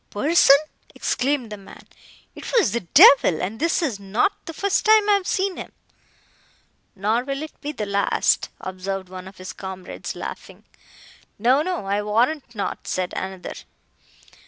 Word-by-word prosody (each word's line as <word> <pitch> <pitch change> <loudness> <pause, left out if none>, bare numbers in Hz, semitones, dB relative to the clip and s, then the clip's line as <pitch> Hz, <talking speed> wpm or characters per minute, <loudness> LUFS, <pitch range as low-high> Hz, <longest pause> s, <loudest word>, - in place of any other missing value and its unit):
"Person!" 280 +4 +5 0.4
exclaimed 255 -3 -1
the 210 - -6
man,—"it 195 0 -14
was 450 - +3
the 235 - 0
devil, 175 - +6
and 200 +5 -4
this 335 +3 +1
is 245 -10 -2
not 200 - +1 0.2
the - - -4
first 395 +4 0
time 435 -1 +5
I 415 - +5
have 395 -2 0
seen 385 -1 -1
him!" - - -8 1.2
"Nor 215 +5 0
will 275 +2 -4
it 310 - -11
be 295 - -4
the 215 -8 -4
last," 200 0 +1
observed 190 0 -5
one 185 0 -9
of 190 - -13
his 185 +1 -8
comrades, 190 -1 -7
laughing. - - -8 0.7
"No, 250 +6 +3
no, 355 - -3
I 200 +1 0
warrant 235 +5 0
not," 200 - -4
said 185 -1 -2
another. 190 -1 -5
220 Hz, 155 wpm, -22 LUFS, 195-305 Hz, 1.2 s, devil